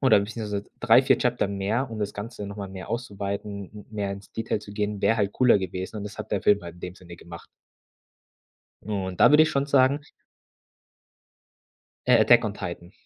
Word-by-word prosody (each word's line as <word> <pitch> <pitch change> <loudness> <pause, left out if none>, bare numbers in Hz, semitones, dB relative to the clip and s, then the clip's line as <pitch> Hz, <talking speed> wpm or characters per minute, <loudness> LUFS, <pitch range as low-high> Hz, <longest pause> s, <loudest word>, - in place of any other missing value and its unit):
oder 130 -7 +5
beziehungsweise 105 -1 -4 0.2
3, 120 +1 +6
4 130 - +3
Chapter 120 -5 0
mehr, 105 +6 -1
um 110 - -6
das 105 -1 -3
Ganze 105 0 -6
noch 100 +1 -8
mal 100 -1 -5
mehr 95 -1 -9
auszuweiten, 100 -3 -4
m 105 - -11
mehr 100 -2 -3
ins 100 0 -11
Detail 115 -1 -2
zu 100 -1 -11
gehen, 105 -1 -3
wäre 110 +3 +3
halt 100 -1 0
cooler 125 -5 +4
gewesen 95 +3 -5
und 100 - -6
das 105 - -8
hat - - -7
der 100 - +1
Film 105 -2 +4
halt 85 0 -8
in - - -16
dem 90 0 -6
Sinne 85 -1 -12
gemacht. 85 0 -11 1.4
Und 95 -3 -4
da - - +8
würde 150 +1 +7
ich 155 - +2
schon 140 0 0
sagen 140 0 +3 2.1
äh, - - +6
Attack - - +6
on 105 - -2
Titan. 85 -2 -7
105 Hz, 200 wpm, -25 LUFS, 100-115 Hz, 2.1 s, da